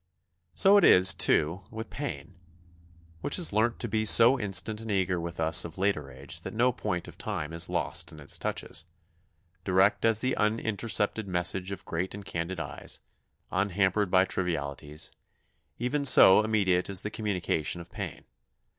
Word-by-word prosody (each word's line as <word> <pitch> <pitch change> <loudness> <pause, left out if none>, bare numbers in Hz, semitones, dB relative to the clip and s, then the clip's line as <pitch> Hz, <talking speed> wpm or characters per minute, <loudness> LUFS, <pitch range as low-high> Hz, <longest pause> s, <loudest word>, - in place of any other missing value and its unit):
So 200 +1 +5
it 200 - +4
is, 95 +1 +7
too, 85 +6 +1
with 110 +1 -8
pain, 140 -8 -6 0.9
which 140 - -2
has 175 - +1
learnt 110 +3 +1
to 120 - -3
be 110 0 -1
so 115 +4 +7
instant 105 +2 0
and 110 - -8
eager 95 -3 0
with 85 0 -7
us 80 0 +5
of 85 0 -9
later 95 -7 -1
age 70 +5 -7
that 110 - -8
no 125 +3 +3
point 100 -7 -4
of - - -13
time 75 +2 -4
is 85 - -2
lost - - -2
in 80 - -13
its 70 - -6
touches - - -4 0.8
direct 95 +2 +2
as 115 -2 +2
the 130 0 0
unintercepted 110 -1 -1
message 90 +1 -1
of 100 0 -8
great 90 +4 -4
and 100 -1 -10
candid 85 +1 -4
eyes, - - -6 0.5
unhampered 95 +1 0
by 95 +1 +4
trivialities; 75 -5 -4 0.7
even 130 +5 -2
so 105 -7 +7
immediate 100 -5 0
is 95 -1 0
the 105 - -5
communication 90 -7 -2
of 85 - -12
pain. - - -7
95 Hz, 165 wpm, -28 LUFS, 85-110 Hz, 0.9 s, is